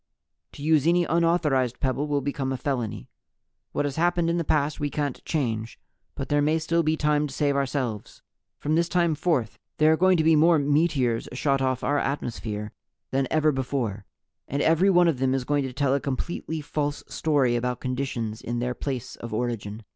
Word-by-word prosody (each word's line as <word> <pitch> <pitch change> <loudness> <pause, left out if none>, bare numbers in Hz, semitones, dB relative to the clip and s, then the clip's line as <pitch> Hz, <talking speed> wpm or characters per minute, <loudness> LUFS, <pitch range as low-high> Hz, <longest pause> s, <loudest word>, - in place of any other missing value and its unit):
To 145 - -9
use 155 -1 +3
any 175 +1 +4
unauthorized 160 -7 +1
pebble 135 +1 -1
will 145 -1 0
become 135 -1 -2
a 130 - -2
felony. 120 - -3 0.6
What - - -1
has 140 0 -3
happened 175 0 +2
in 170 - 0
the 170 - 0
past 150 -1 0
we 145 - -1
can't 145 -3 -3
change, 115 -7 -2 0.4
but - - -4
there 145 0 +2
may 155 +2 +2
still 165 +1 +1
be 160 0 +1
time 150 0 +1
to 135 - -9
save 145 -1 +1
ourselves. 130 -6 -3 0.3
From 150 - -2
this 170 +1 +2
time 170 -2 +2
forth 145 -8 -1 0.2
there 155 0 +5
are - - +5
going 185 +1 +4
to 160 - +2
be 160 0 +5
more 165 +2 +5
'meteors' 145 -5 +1
shot 135 +1 +1
off 130 -2 0
our 145 0 +1
atmosphere 110 -7 -3 0.4
than 135 0 +1
ever 155 -1 +3
before 125 -7 -2 0.4
and 140 +2 -1
every 165 +5 +4
one 175 -2 +5
of 155 -6 +1
them 130 0 +2
is 135 - -1
going 145 +1 0
to 130 - -4
tell 135 +1 +1
a 140 - +2
completely 155 +4 -4
false 145 0 -3
story 140 -6 +1
about 125 +1 -1
conditions 125 -4 -3
in 120 +1 -3
their 125 +1 -1
place 130 -2 -5
of 115 -2 -6
origin. 110 -2 -3
140 Hz, 195 wpm, -25 LUFS, 125-155 Hz, 0.6 s, there